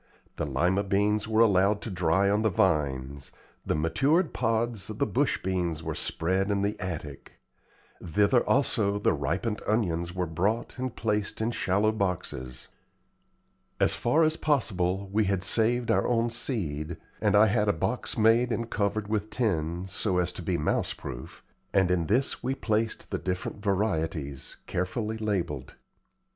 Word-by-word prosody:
The 75 - -2
Lima 90 +9 +1
beans 105 +2 +1
were 110 0 +3
allowed 100 -1 +4
to 110 - -5
dry 90 +2 +2
on 105 +2 +2
the 110 - +3
vines; 70 -7 0 0.3
the - - -1
matured 135 - +2
pods 115 -2 -1
of - - -6
the - - +2
bush - - +1
beans 85 -4 -1
were - - -3
spread 95 +4 -1
in 100 -1 +1
the 105 +1 0
attic; 80 -6 -6 0.7
thither 100 +8 +3
also 105 -7 +2
the 105 - +2
ripened 110 -3 -2
onions 85 -6 0
were 90 -1 0
brought 100 +10 -1
and 130 -1 -3
placed 105 -2 -1
in 110 +2 0
shallow 105 0 +1
boxes. 80 - -3 1.1
As - - +3
far 150 +8 +2
as 155 0 +2
possible 100 - 0
we 110 0 +3
had 95 -1 0
saved 115 +4 +2
our - - +2
own 120 -1 +1
seed, 85 - -2 0.2
and 105 -2 +3
I 105 +1 +7
had 105 - +2
had 105 0 +2
a - - +4
box 80 - -2
made 115 +3 +4
and 115 0 -2
covered 105 0 -1
with 105 0 -1
tin, 90 -7 -1
so 95 0 -1
as 90 0 +1
to - - -8
be 90 +1 -1
mouse 75 - 0
proof, - - -9 0.3
and 95 -2 +4
in 85 -3 +1
this 125 +6 +1
we 130 +2 -1
placed 110 -2 -1
the - - -1
different 95 +3 -4
varieties, 80 - -1
carefully 110 +4 -2
labelled. 90 -11 -2
100 Hz, 160 wpm, -28 LUFS, 85-110 Hz, 1.1 s, I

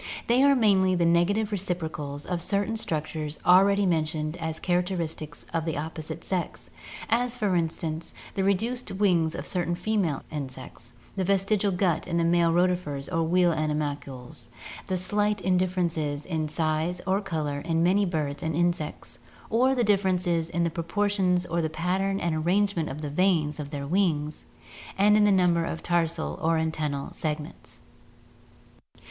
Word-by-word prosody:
They 240 +2 +3
are 280 0 +6
mainly 195 -6 +4
the 175 -1 +2
negative 195 +6 +2
reciprocals 160 -7 -3
of 180 -2 -2
certain 200 +5 +1
structures 155 -6 -3
already 195 +3 +5
mentioned 155 -2 0
as 160 -2 -4
characteris 175 -2 0
tic 155 0 -8 0.2
of 165 -1 0
the 160 -2 -2
opposite 160 +1 -5
sex, 125 - -4 0.4
as 245 +1 +1
for 205 -5 +1
instance, 160 -1 -2 0.2
the 195 - -1
reduced 225 +6 0
wings 180 -5 +2
of - - -5
certain 175 -1 -1
female 185 -8 -1
insects, 130 -5 -7 0.2
the 190 - 0
vestigial 195 +2 +2
gut 180 -3 0
in 170 -1 -1
the 170 - +2
male 170 0 +3
rotifers 175 -5 0
or 165 - +2
wheel 175 +2 +3
ani 155 -2 0
malcules, 135 -5 -4 0.4
the 185 - 0
slight 205 +3 0 0.2
differences 165 -5 -1
in 160 -3 -2
size 160 +3 -1
or 195 +2 +1
color 150 -6 -2
in 165 +2 0
many 190 +4 +3
birds 155 -6 -2
and 160 -1 -2
insects, 170 -7 -2 0.3
or 255 +4 +3
the 245 - +2
differences 185 -5 +1
in 170 0 0
the 170 - 0
proportions 180 +1 0
or 170 +1 -1
the 160 - -1
pattern 185 +5 -1
and 170 -2 -1
arrangement 175 +1 +1
of 150 +3 -6
the 145 - -3
veins 160 -3 +1
of 145 -1 -5
their 145 -2 -5
wings 155 -3 0 0.5
and 205 +2 +5
in 210 -1 +5
the 205 - +4
number 180 -3 +3
of 165 - -4
tarsal 170 -2 0
or 165 0 +2
antennal 155 -3 -2
segments. 150 -1 -5
170 Hz, 160 wpm, -27 LUFS, 155-190 Hz, 0.5 s, are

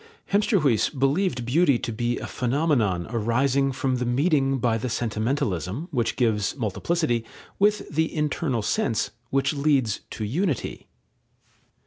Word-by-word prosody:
Hemsterhuis 195 - +3
believed 135 -1 0
beauty 140 +1 +3
to 120 - -4
be 120 +2 -1
a - - -5
phenomenon 125 - 0
arising 125 +4 +1
from 130 0 -1
the 125 - -2
meeting 135 +1 +2
by 115 -2 +1
the 125 - -3
sentimentalism, 115 - -2
which 120 -5 0
gives 110 -5 +1
multiplicity, 120 - 0 0.4
with 205 0 +2
the 160 +2 0
internal 150 -6 -1
sense, 115 - 0 0.2
which 135 0 +1
tends 140 -7 +1
to 110 - -4
unity. 150 - -2
130 Hz, 125 wpm, -25 LUFS, 115-150 Hz, 0.4 s, Hemsterhuis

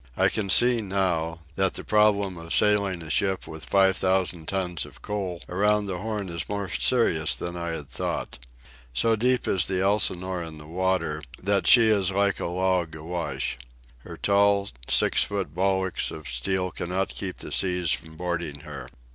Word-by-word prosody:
I - - +4
can 100 -3 -2
see, 120 +3 +5
now, 90 -5 -1
that 95 +2 0
the - - -4
problem 105 -3 +3
of 85 0 -3
sailing 100 -4 +2
a 80 - -9
ship 95 +2 +1
with 80 -2 -8
five 95 +1 +4
thousand 95 -3 0
tons 90 -4 -2
of - - -13
coal 95 -4 -4
around 105 +3 +2
the 95 -3 -4
Horn 105 -1 -3
is 85 -2 -4
more 100 -1 -2
serious 85 -12 +2
than 85 0 -5
I 85 0 -4
had 75 -4 -6
thought. 60 - -4 0.6
So 115 - +3
deep 125 +2 +1
is 90 -5 +1
the 95 -1 -1
Elsinore 95 -3 +1
in 80 -2 -7
the 75 - -12
water 85 -2 -1 0.2
that 100 +1 0
she 115 -3 +8
is 100 -4 +3
like 100 0 +1
a - - -2
log 90 -2 0
awash. 80 -6 -3 0.4
Her - - -10
tall, 100 0 +3 0.2
six - - +4
foot 100 -7 -3
bulwarks 95 +1 0
of 80 -2 -8
steel 90 +10 -1
cannot 95 +2 -2
keep 95 -2 -5
the - - -8
seas 90 -3 +1
from 80 -1 -2
boarding 85 -4 -3
her. 75 -3 -9
95 Hz, 175 wpm, -26 LUFS, 85-100 Hz, 0.6 s, she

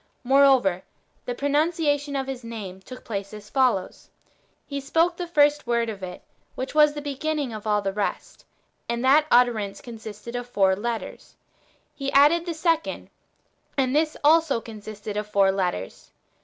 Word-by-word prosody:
^Moreover, 260 -9 +4 0.4
the 245 - -3
pro 280 - -2
nunciation 290 -2 +1
of 265 - -3
His 265 -2 -6
name 210 -5 -7
took 255 +7 -11
place 200 -1 -5
as 210 0 -12
follows: 250 -9 0 0.3
— - - -41
He 280 -1 -5
spake 325 +5 +1
the 355 0 -5
first 295 -4 +3
word 235 -1 +1
of 205 -3 -7
it, 180 -1 -7 0.3
which 260 - -5
was 300 -1 +5
the 295 - -5
beginning^ 290 -3 -2
[of 215 0 -7
all 210 -1 +1
the 195 0 -2
rest], 205 0 -4 0.5
and 235 +2 -1
that 300 +3 +5
utterance 225 -5 +2
consisted 225 0 -9
of 245 0 -5
four 190 -4 +3
letters. 230 +3 -5 0.6
He 275 -2 -4
added 310 +5 +5
the 335 - -3
second, 325 0 -1 0.7
and 265 0 +1
this 310 0 +1
also 315 -4 +4
consisted 215 -2 -8
of 210 0 -3
four 200 -2 +3
letters. 180 - -3
245 Hz, 165 wpm, -24 LUFS, 210-290 Hz, 0.7 s, was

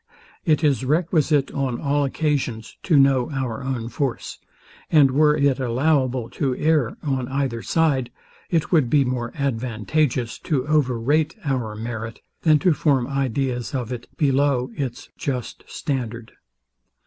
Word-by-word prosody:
It 155 -2 +2
is 140 -3 +2
requisite 150 -1 +2
on 130 -3 -2
all 145 -1 +1
occasions 135 -6 -2
to 160 -6 +3
know 135 -2 +4
our 135 -4 -3
own 130 -4 -3
force; 130 +1 -3 0.5
and 145 -4 +6
were 150 +2 +4
it 140 -2 +2
allowable 130 -1 +1
to 135 -3 -1
err 150 -6 +1
on 135 -4 -1
either 135 -3 -2
side, 140 -6 +1 0.4
it 165 -3 0
would 155 -9 +3
be 140 +1 +4
more 125 -1 -2
advantageous 125 -1 -1
to 140 -6 -1
over 140 -6 +2
rate 150 +6 +1
our 125 -6 -1
merit, 115 0 -5 0.2
than 155 -2 +5
to 180 - +6
form 140 -5 +2
ideas 135 -1 -2
of 125 -1 -3
it, 120 -1 -7
below 135 -3 +2
its 135 -5 -5
just 125 -4 -4
standard. 120 -5 -4
135 Hz, 140 wpm, -23 LUFS, 125-150 Hz, 0.5 s, and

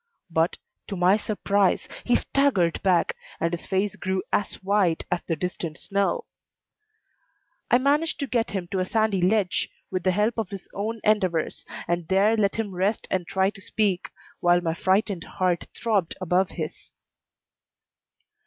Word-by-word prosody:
But, 165 +1 +1 0.3
to 200 - -4
my 180 +2 +4
surprise, 205 -2 +1 0.2
he 245 - +3
staggered 225 -13 +2
back, 185 -3 +2 0.2
and 165 +1 0
his 170 - -4
face 195 +1 0
grew 190 0 -2
as 205 - +1
white 190 -4 +2
as 180 - +1
the 165 - +1
distant 170 -1 -4
snow. 200 - 0 1.4
I 245 - +6
managed 290 +5 +1
to - - +1
get 240 -3 0
him 190 -3 -3
to 195 - 0
a 185 - +1
sandy 215 -3 +1
ledge, 190 0 +2 0.2
with 185 -1 -1
the 185 - +2
help 210 +5 +1
of 215 -5 -2
his 195 -2 -7
own 220 +2 -3
endeavors, 185 -7 +1 0.2
and 175 -1 -1
there 200 +4 +4
let 200 -3 +1
him 220 -4 -2
rest 195 +4 0
and 180 -3 0
try 190 +1 +2
to 205 -2 -13
speak, 195 -2 0 0.3
while 175 0 +4
my 165 -2 -1
frightened 190 +1 +1
heart 180 -2 +1
throbbed 205 -7 0
over 185 +1 +2
his. - - -6
190 Hz, 160 wpm, -25 LUFS, 180-215 Hz, 1.4 s, I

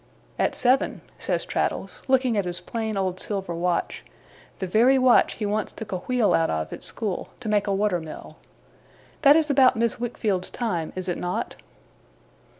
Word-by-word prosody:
'At - - +1
seven,' 255 +2 +2 0.2
says - - -1
Traddles, - - -2
looking 260 -3 +3
at 200 -3 0
his 175 0 -4
plain 220 -2 -4
old 185 -1 -1
silver 195 -4 -2
watch 175 +1 -1 0.5
the 190 - -3
very 235 +8 +4
watch 255 -1 +5
he 215 - -4
once 210 +1 -1
took 220 -1 -8
a 185 - -2
wheel 245 +1 +1
out 165 0 +2
of, 80 0 -2
at - - -8
school, 210 -5 -3
to 245 - -7
make 210 -1 +1
a - - +1
water 200 -3 +1
mill. 160 -1 -10 0.8
'That 285 0 +7
is 315 -2 +3
about 265 -2 +5
Miss 230 +1 0
Wickfield's 215 -6 -1
time, 190 -10 -2
is 185 0 -4
it 180 - -2
not? 180 0 -3
210 Hz, 175 wpm, -25 LUFS, 180-245 Hz, 0.8 s, That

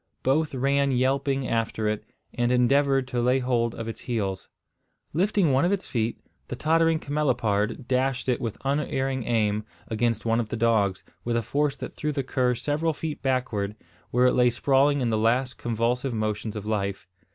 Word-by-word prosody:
Both 145 +2 +1
ran 140 +2 +2
yelping 135 +1 +1
after 115 -1 -1
it, 105 0 -1 0.3
and 120 0 0
endeavoured 135 +2 +3
to 120 -1 -1
lay 125 +2 +3
hold 120 -3 0
of 115 - -5
its 115 - -6
heels. 100 -6 -3 0.6
Lifting 185 -1 +2
one 130 +3 +3
of 175 - +2
its 200 -1 -1
feet, 115 -1 -1 0.3
the - - -4
tottering 165 +1 +2
camelopard 130 -6 0
dashed 130 0 0
it 125 -2 +1
with 115 -3 -3
unerring 135 -3 -1
aim 110 -2 +1 0.3
against 115 0 0
one 115 0 +2
of 115 -3 -2
the 115 - -3
dogs, 105 -5 +2 0.2
with 120 0 0
a 115 - 0
force 145 +4 0
that - - -7
threw 150 - -2
the 140 -2 -2
cur 125 -1 +1
several 155 +6 -1
feet 155 0 -5
backward, 125 -6 -1 0.3
where 125 +1 +3
it 125 - +4
lay 125 -1 +4
sprawling 135 +3 +2
in 120 -2 +1
the 110 - +1
last 125 +2 +1
convulsive 120 +2 -1
motions 110 0 -2
of 105 -1 -5
life. 100 -4 -2
125 Hz, 180 wpm, -26 LUFS, 115-140 Hz, 0.6 s, it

